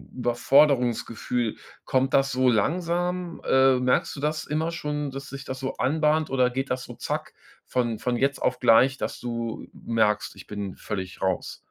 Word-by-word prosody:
Überforderungsgefühl? 125 -2 +2 0.3
Kommt 130 0 +1
das 135 0 +3
so 130 0 +3
langsam? 175 - 0
Äh, 130 0 +5
merkst 125 0 +1
du - - -7
das 155 +1 -1
immer 160 +3 -1
schon, 150 -3 -3
dass 135 +1 -7
sich 140 0 -8
das 130 0 -5
so 130 0 -3
anbahnt 155 +2 +1
oder 130 -2 +3
geht 135 +2 -3
das 125 0 -1
so - - -10
zack, - - -4 0.3
von 120 -3 0
von 125 +1 -1
jetzt 140 +2 +1
auf 125 0 0
gleich, 125 +3 +5
dass - - -4
du 115 -2 -4
merkst: 105 -2 0
„Ich - - -12
bin 100 -2 -5
völlig 95 -3 -6
raus?“ 95 -1 -1
130 Hz, 170 wpm, -25 LUFS, 120-145 Hz, 0.3 s, Äh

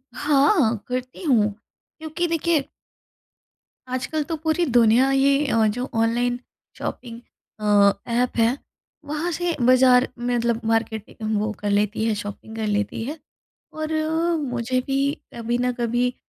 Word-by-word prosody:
हाँ, 285 - +3
करती 255 +5 -5
हूँ। 225 -9 +3 0.5
क्योंकि 315 +2 -2
देखिए 330 -3 0 1.3
आजकल 300 +4 -2
तो 330 - -1
पूरी 325 +2 +1
दुनिया 240 +3 +5
ही 275 +2 +3
अ, 225 -4 +3
जो 245 +5 -3
ऑनलाइन 240 +2 +1 0.4
शॉपिंग 235 -2 -6 0.4
अ, 205 -1 +5 0.3
एप 250 - -4
है 230 +3 +3 0.5
वहाँ 305 +4 -2
से 350 0 -1
बाज़ार 255 0 +5
मतलब 240 -1 0
मार्केटिंग 220 -1 -1
वो 215 +1 -1
कर 205 - -2
लेती 210 +2 +1
है 225 - +1
शॉपिंग 205 +2 -8
कर 220 -1 -2
लेती 205 +1 -1
है। 290 +7 -5 0.6
और 310 0 -4 0.5
मुझे 250 -2 -1
भी 270 0 0 0.4
कभी 235 +1 -1
न 250 0 +1
कभी 240 +1 0
245 Hz, 135 wpm, -23 LUFS, 225-280 Hz, 1.3 s, दुनिया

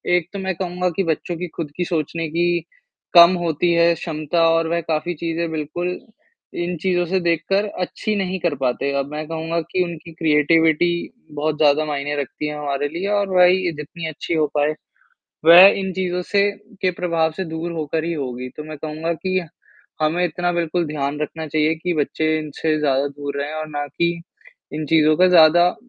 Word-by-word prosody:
एक 175 -1 -1
तो 200 - -4
मैं 190 -2 -2
कहूँगा 180 0 -2
कि 195 - +1
बच्चों 165 +1 -2
की 180 - -4
खुद 155 -4 -5
की 180 - 0
सोचने 165 -1 -2
की 175 +2 +1 0.5
कम 170 +1 +9
होती 170 0 0
है, 170 0 +4
क्षमता 165 0 0
और 165 0 +2
वह 170 +1 0
काफ़ी 165 +2 -2
चीज़ें 165 +1 -3
बिल्कुल, 160 +4 -3 0.6
इन 175 +1 -2
चीज़ों 175 -1 +1
से 190 +2 0
देखकर 175 +4 +1 0.2
अच्छी 215 +4 -2
नहीं 190 -1 -2
कर 165 -3 0
पाते। 135 +1 -1
अब 140 +1 -4
मैं 155 0 -5
कहूँगा 165 +1 -2
कि 185 -1 +2
उनकी 170 -1 -8
क्रिएटिविटी 160 +1 +3 0.5
बहुत 150 +1 -1
ज़्यादा 150 0 +3
मायने 145 -1 -3
रखती 150 +2 -5
है 150 - -4
हमारे 145 -1 -2
लिए 170 +6 -4
और 205 -1 0
वही 180 +1 +6
ये 175 - +1
जितनी 160 +2 -6
अच्छी 160 +2 -5
हो 155 -1 +2
पाए। 150 +1 +2 0.7
वह 170 +3 +10
इन 190 0 -3
चीज़ों 180 -1 -2
से 200 0 +4 0.3
के 185 - +2
प्रभाव 170 -2 0
से 190 - -1
दूर 160 +1 -5
होकर 160 -1 -2
ही 170 +1 -2
होगी, 125 -4 -5
तो 150 - -9
मैं 155 0 -8
कहूँगा 155 +3 -3
कि 185 +3 -1 0.6
हमें 160 +3 +1
इतना 175 +1 -1
बिल्कुल 170 0 -1
ध्यान 145 -1 -3
रखना 160 +1 -4
चाहिए, 155 +1 +1
कि 175 +2 -2
बच्चे 155 +1 0
इनसे 155 +1 -2
ज़्यादा 140 -1 +1
दूर 145 0 -6
रहें 145 +2 -4
और 155 0 -4
ना 145 -1 -3
कि, 170 +4 -1 0.5
इन 155 0 -3
चीज़ों 155 -1 +4
का 185 +1 +6
ज़्यादा 170 0 +6
अ, 180 - -2
165 Hz, 190 wpm, -21 LUFS, 150-175 Hz, 0.7 s, वह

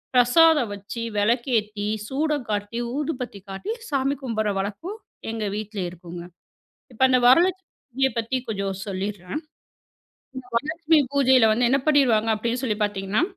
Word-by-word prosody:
பிரசாதம் 270 +1 +5
வச்சி, 200 +3 -7 0.2
வெளக்கேத்தி, 215 -2 0 0.2
சூடம் 290 0 -1
காட்டி, 205 +2 -2 0.2
ஊதுபத்தி 255 -8 -4
காட்டி 195 - -5 0.2
சாமி 275 0 0
கும்பிடுற 220 -4 -1
வழக்கம் 305 - -4 0.3
எங்க 225 -1 -3
வீட்ல 215 -1 -5
இருக்குங்க. 175 0 -9 0.7
இப்ப 230 - -11
அந்த 255 - +4
வரலட்சுமி 365 +8 +4 0.2
பூஜைய 265 +1 0
பத்தி 235 +3 -1
கொஞ்சம் 195 -2 -2
சொல்லீர்றேன். 195 - -4 1.0
இந்த 260 -1 -7
வரலட்சுமி 315 +4 +2
பூஜையில 260 -4 +5
வந்து 240 +2 +2
என்ன 275 +2 +3
பண்ணிருவாங்க 240 -7 +4
அப்படின்னு 235 +4 -2
சொல்லிப் 215 -4 0
பாத்தீங்கன்னா, 200 0 0
235 Hz, 130 wpm, -24 LUFS, 205-275 Hz, 1.0 s, பிரசாதம்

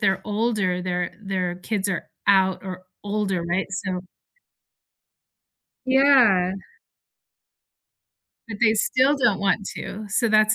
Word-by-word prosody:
they're 190 0 +1
older, 210 -4 -1
their 180 -1 -2
their 185 -3 -2
kids 200 +2 -3
are 180 - -3 0.2
out 190 -1 +3
or 185 -1 -7 0.2
older, 200 -4 -1
right? 175 +3 -1
So 190 -2 -3 1.9
Yeah. 260 -9 +5 2.0
But 220 - -6
they 220 0 +5
still 260 +6 +2
don't 235 -7 +2
want 200 0 0
to. 210 +1 -6
So 235 +4 +1
that's 215 0 +4
200 Hz, 115 wpm, -23 LUFS, 185-220 Hz, 2.0 s, Yeah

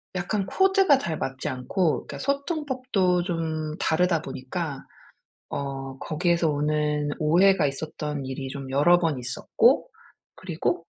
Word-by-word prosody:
약간 190 +3 -1
코드가 385 - +4
잘 165 - -3
맞지 135 -1 -3
않고 155 +6 -1
그러니까 - - -7
소통법도 260 - 0
좀 160 -3 -3
다르다 170 0 +2
보니까 135 +2 -5 0.6
어 135 -1 -5
거기에서 170 +1 +1
오는 150 0 0
오해가 175 +3 +4
있었던 150 0 -4
일이 135 0 -5
좀 135 -1 -7
여러 160 +6 +5
번 160 -6 0
있었고 125 0 +2 0.5
그리고 - - -2
160 Hz, 275 characters per minute, -25 LUFS, 140-185 Hz, 0.6 s, 여러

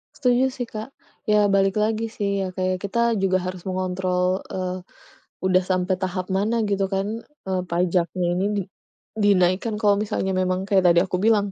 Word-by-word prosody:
Setuju 250 -1 +2
sih, 245 -2 -5
Kak. 220 +3 -7 0.3
Ya 210 -2 +3
balik 195 +1 +2
lagi 220 +1 0
sih, 200 -3 -1
ya 185 - -4
kayak 185 0 -2
kita 235 +3 +1
juga 190 -2 +2
harus 180 -1 -5
mengontrol, 185 0 -1
eee, 185 -1 -3 0.7
udah 185 0 +3
sampai 185 0 0
tahap 185 0 -2
mana 210 +5 +1
gitu 195 -1 +1
kan, 205 +4 -2 0.2
eee, 185 -1 0
pajaknya 175 +1 0
ini 185 +2 0
di 200 - 0 0.5
dinaikkan 200 0 +2
kalau 205 -2 +4
misalnya 210 -2 -1
memang 185 0 0
kayak 195 -2 +3
tadi 170 0 +6
aku 180 -1 -2
bilang, 205 -2 +3
190 Hz, 165 wpm, -23 LUFS, 185-210 Hz, 0.7 s, tadi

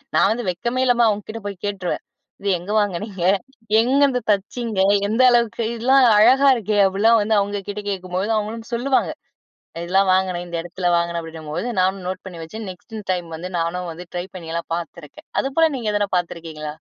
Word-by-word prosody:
நான் 195 - +5
வந்து 235 -1 -2
வெட்கமே 235 +8 -1
இல்லாம 240 -1 +4
அவங்க 210 -1 -1
கிட்ட 225 0 -6
போய் 195 -3 -7
கேட்டுருவேன். 195 -3 -3 0.4
"இது 200 - -1
எங்க 190 +4 -7
வாங்குனீங்க? 200 -1 -2 0.6
எங்கருந்து 265 0 +3
தச்சீங்க? 210 +1 -2 0.3
எந்த 225 +4 +2
அளவுக்கு 235 -1 +2
இதெல்லாம் 260 +3 +4
அழகா 265 +5 +6
இருக்கே." 210 -1 0
அப்படிலாம் 220 +4 +4
வந்து 220 +1 +1
அவங்க 200 0 -3
கிட்ட 205 0 -5
கேட்கும்போது, 185 +1 -3
அவங்களும் 225 +2 -4
சொல்லுவாங்க. 260 +3 +1 0.7
"இதெல்லாம் 190 +2 +3
வாங்கினேன். 185 -2 0
இந்த 170 -1 -4
இடத்தில 175 +1 -2
வாங்கினேன்." 170 0 -1
அப்படின்னும்போது 160 +5 -5
நானும் 190 0 0
நோட் 185 0 -5
பண்ணி 175 -3 -9
வச்சு, 215 +6 -7
நெக்ஸ்ட் 220 +5 -11 0.2
டைம் 175 -2 -4
வந்து 180 +3 -7
நானும் 175 +1 -2
வந்து 180 +2 -10
ட்ரை 175 +1 -2
பண்ணி 165 -3 -7
எல்லாம் 170 0 -4
பார்த்திருக்கேன். 170 -3 -9
அதுபோல 315 +4 +2
நீங்க 225 -3 -2
எதாவது 205 -1 0
பார்த்திருக்கீங்களா? 160 -3 -5
200 Hz, 170 wpm, -21 LUFS, 175-225 Hz, 0.7 s, அழகா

